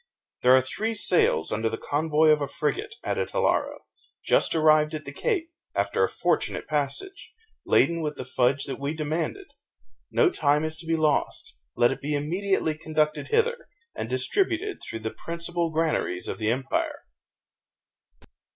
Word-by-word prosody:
"There 125 +1 +7
are 130 - +4
three 220 +12 -2
sails, 170 - +2
under 110 +1 0
the 115 - -4
convoy 155 +1 +2
of 150 -1 +4
a 140 - -1
frigate," 415 - -2
added - - -1
Hilaro, - - 0 0.4
"just - - +3
arrived 155 0 +4
at 155 - -6
the - - -6
Cape, 365 -9 -1 0.2
after - - +1
a - - +2
fortunate - - -1
passage, 155 - -3 0.4
laden 170 -1 +3
with 150 -1 -3
the 130 - -5
fudge 130 +2 +1
that 135 - -5
we 140 +3 -2
demanded. 160 - -2 0.6
No 385 -6 +3
time 150 - +2
is 155 0 -2
to 165 0 -8
be 165 - +2
lost; 155 - 0 0.2
let 120 0 +4
it - - -5
be 150 +1 -1
immediately 165 +2 0
conducted 155 -1 -1
hither, 475 +2 +1 0.3
and - - -5
distributed 395 0 0
through 115 - -6
the 110 0 -4
principal 170 0 -2
granaries 155 - -1
of - - -4
the 110 -1 0
empire." 130 +3 -1
155 Hz, 160 wpm, -26 LUFS, 140-185 Hz, 0.6 s, There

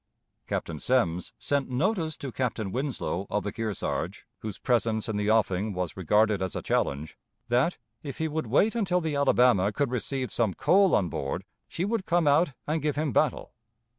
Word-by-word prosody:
Captain 80 -2 -3
Semmes 90 - +1
sent 140 -2 0
notice 160 - 0
to 135 - -6
Captain 115 -6 -2
Winslow, 125 -7 -2
of 105 - -1
the 105 - -3
Kearsarge, 110 -3 -3
whose 110 -3 -6
presence 115 -3 0
in 110 - -2
the 105 0 0
offing 105 -2 +2
was 90 -2 -3
regarded 105 +3 +2
as 95 -1 -2
a - - -3
challenge, 75 +3 -1 0.3
that, 125 +9 +2 0.2
if 140 -3 -7
he 160 - 0
would 155 -4 -3
wait 190 - +3
until 195 -6 +1
the 160 -4 -2
Alabama 125 -8 +4
could 130 +4 -1
receive 130 +1 -2
some 110 -6 +1
coal 185 +7 +4
on 95 - +2
board, 70 +5 -3 0.2
she 175 - -2
would 210 -2 -2
come 175 -1 +2
out 145 +1 +4
and 155 +1 -1
give 150 0 0
him 150 -1 0
battle. 150 0 0
125 Hz, 180 wpm, -27 LUFS, 105-155 Hz, 0.3 s, Alabama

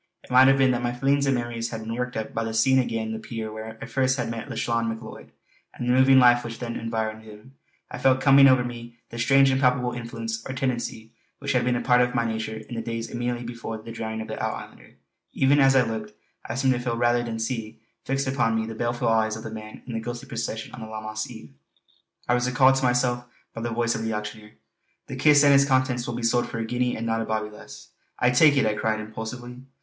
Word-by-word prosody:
It - - -15
might 130 +1 +7
have 135 0 +5
been 135 -1 +4
that 120 -1 -1
my 120 0 -1
feelings 140 +3 +1
and 135 - +3
memories 120 -1 -3
had 115 -1 -6
been 110 +1 -5
worked 125 +1 -3
up 110 - -4
by 115 - -1
the 110 0 -4
seeing 130 +4 +4
again 115 -3 -2
the 110 - -4
pier 110 -1 -6
where 110 +1 -8
first 130 0 +1
I 125 - 0
had 115 - -4
met 115 -1 -6
Lauchlane 115 -1 -1
Macleod, 110 0 -8 0.4
and 120 - -4
the 125 - +3
moving 130 +1 +6
life 120 -1 +6
which 115 -1 -6
then 120 -1 -5
had - - -6
environed 110 -1 -3
him. 110 +4 -14 0.4
I - - -6
felt 130 -1 +3
coming 135 0 +7
over 130 -2 +5
me 120 -1 -8
that 115 - -7
strange 135 +3 +5
impalpable 125 -2 +2
influence 115 -1 -5
or 130 - -4
tendency 120 -3 -3 0.2
which 140 - -3
had 125 -2 +2
been 125 0 +1
a 120 - -1
part 125 -1 +4
of 125 0 0
my 115 -2 +1
nature 110 -1 -3
in 110 +2 -10
the 115 - -3
days 115 0 -5
immediately 120 0 -3
before 115 -1 -6
the 115 +1 -10
drowning 110 -1 -4
of 110 - -7
the - - -5
Out - - -1
islander. - - -12 0.4
Even 140 +2 +3
as 135 -1 +5
I 130 - +6
looked, 110 -2 -5 0.4
I 115 - -3
seemed 130 0 +2
to 120 - -2
feel 120 -2 -2
rather 120 0 +2
than 115 -1 -4
see 110 -1 -4 0.2
fixed 135 +1 -1
upon 125 -4 +1
me 110 0 0
the 115 - -6
baleful 120 +1 -2
eyes 110 -1 +2
of 110 - -8
the 110 - -6
man 110 -1 -9
in 125 - -7
the 115 - -2
ghostly 120 +1 -6
procession 110 -1 -5
on 125 - -9
that 110 - -7
Lammas 110 0 -5
eve. 110 - -12 0.7
I - - +2
was 125 0 +1
recalled 130 +1 +5
to 135 - -2
myself 125 0 +1 0.3
by 115 - -6
the 120 - -2
voice 115 0 0
of 110 - -3
the 110 0 -2
auctioneer: 105 0 -6 0.5
"The - - -7
kist 150 -1 +5
and 140 -1 +6
its 140 0 +6
contents 130 -2 +1
will 120 - -3
be 120 - -5
sold 120 +1 +1
for 120 - -5
a 115 - -2
guinea 125 +1 -1
and 115 - -4
not 115 0 0
a - - -1
bawbee 110 -1 -2
less." 70 -9 -13 0.3
"I 125 - +3
take 145 +3 +5
it!" 135 - +3
I 110 - +2
cried 110 0 -1
impulsively. 110 +3 -7
120 Hz, 255 wpm, -25 LUFS, 110-125 Hz, 0.7 s, might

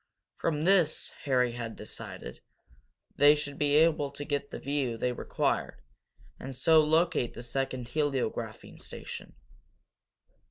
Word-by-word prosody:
From 150 -2 0
this, 175 -4 +3
Harry 125 -3 +3
had 115 -1 -5
decided, 60 - -8 0.8
they 145 +1 +7
should 145 -1 -5
be 145 -1 +3
able 155 -2 +4
to 140 +1 -6
get 145 -1 -2
the - - -6
view 135 -4 -1
they 125 +2 0
required 125 - -1 0.6
and 135 0 -6
so 160 +5 +5
locate 160 -4 +2
the 120 - -7
second 125 0 -3
heliographing 140 -4 -2
station. - - -8
145 Hz, 125 wpm, -30 LUFS, 125-150 Hz, 0.8 s, they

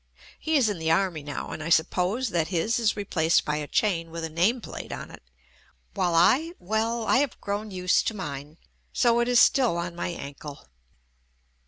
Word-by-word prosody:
He 315 -1 +1
is 255 -5 +3
in 205 -5 -2
the 160 0 -1
army 170 -1 +1
now, 145 0 -6
and - - -6
I 155 - -4
sup 160 0 +3
pose 210 +8 0
that 170 -4 0
his 195 +6 0
is 220 -2 +1
replaced 170 -5 +1
by 150 0 -1
a 150 -1 -4
chain 170 -5 0
with 165 0 -6
a 160 - -3
name 185 +10 +2
plate - - -8
on - - -7
it, - - -13 0.7
while 180 -4 0
I 275 - +4
— - - -39
well, 220 +4 -1
I 255 - +3
have 280 -1 0
grown 205 +2 -4
used 185 -1 +1
to 220 - -1
mine 145 -4 -7 0.3
so 235 -1 +3
it 240 - +1
is 245 -1 +4
still 250 -11 +4
on 170 0 -4
my 175 - -3
ankle. 145 - -8
185 Hz, 205 wpm, -26 LUFS, 165-225 Hz, 0.7 s, I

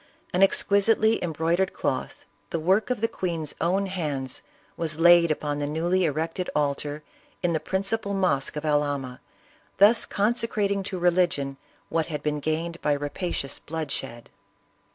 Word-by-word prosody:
An 180 - +2
ex 195 - +5
quisitely 220 +2 +3
embroidered 170 +3 0
cloth, - - -3 0.2
the 165 - -2
work 190 +9 +2
of 250 -4 -1
the 225 - +3
queen's 165 -7 -3
own 185 +4 +1
hands, 150 -9 -3 0.3
was 160 -1 -3
laid 175 0 +7
upon 145 -1 -1
the 145 - -1
newly 175 +5 +1
erected 165 +4 -2
altar 145 0 -1 0.4
in 175 -1 +2
the 160 - +1
principal 200 +3 -1
mosque 165 -9 +1
of 150 +1 -4
Albania, 145 -4 0 0.6
thus 210 +4 +5
consecrating 210 -2 0
to 190 -1 -4
religion 170 -6 +1 0.3
what 160 -1 0
had 150 -3 -5
been 150 -1 -1
gained 165 +3 -2
by 150 - +2
rapacious 145 0 -3
bloodshed. 140 -6 -4
165 Hz, 145 wpm, -26 LUFS, 150-190 Hz, 0.6 s, laid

